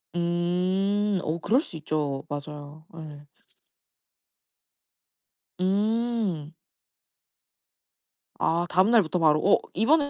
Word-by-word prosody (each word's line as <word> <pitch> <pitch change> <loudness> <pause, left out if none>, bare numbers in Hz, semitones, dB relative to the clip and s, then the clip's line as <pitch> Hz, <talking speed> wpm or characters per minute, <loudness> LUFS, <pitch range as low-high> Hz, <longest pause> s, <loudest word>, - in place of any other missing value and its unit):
음. 185 +4 0
오 160 +2 -2
그럴 225 - +2
수 170 - -9
있죠. 150 -3 -2
맞아요. 145 +1 -8
예. 150 -2 -10 2.3
음. 205 -4 0 1.9
아 170 +1 +1
다음 185 +3 +3
날부터 195 -7 +3
바로. 155 -2 +4
어 200 - +6 0.2
이번에 285 - +3
175 Hz, 145 characters per minute, -26 LUFS, 155-205 Hz, 2.3 s, 어